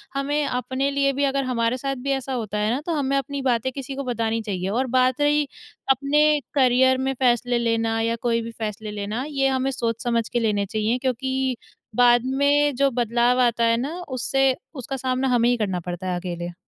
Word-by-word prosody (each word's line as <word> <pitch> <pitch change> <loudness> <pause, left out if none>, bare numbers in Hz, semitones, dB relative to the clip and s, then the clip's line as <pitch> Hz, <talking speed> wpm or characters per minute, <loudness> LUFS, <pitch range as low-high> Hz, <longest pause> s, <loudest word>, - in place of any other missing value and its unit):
हमें 285 +2 0
अपने 260 +2 -1
लिए 275 0 +1
भी 280 +2 -1
अगर 275 0 0
हमारे 235 -1 0
साथ 275 +1 -3
भी - - +2
ऐसा 265 0 -5
होता 215 -4 -3
है 210 +2 +1
ना, 280 - -3
तो 335 +2 -3
हमें 275 -1 0
अपनी 275 +1 -3
बातें 255 -1 0
किसी 270 0 -6
को 275 - -4
बतानी 230 -2 -1
चाहिए। 190 -3 -3
और 255 +5 0
बात 255 +2 +2
रही 295 0 +3 0.4
अपने 295 +3 +3 0.2
करियर 260 -1 +4
में 265 +1 -1
फ़ेेसले 245 -1 +2
लेना 225 -1 0
या 230 +1 0
कोई 230 -1 +2
भी 230 0 -6
फ़ेेसले 215 -1 -5
लेना, 210 +4 -3
ये 275 -3 +1
हमें 265 0 0
सोच 230 -3 -2
समझ 235 -2 0
के 240 - 0
लेने 210 -3 +1
चाहिए 215 +4 -1
क्योंकि 260 0 -1 0.4
बाद 240 -1 +5
में 285 +2 +2
जो 275 +2 +3
बदलाव 240 +1 +2
आता 235 -1 +2
है 230 0 +3
ना, 270 +6 -3 0.2
उससे 265 +1 +1 0.2
उसका 270 0 -5
सामना 260 +1 -1
हमें 240 -1 +3
ही 245 - +2
करना 190 -5 -1
पड़ता 175 +2 -5
है 180 - -1
अकेले। 175 -1 -5
250 Hz, 205 wpm, -23 LUFS, 230-270 Hz, 0.4 s, बाद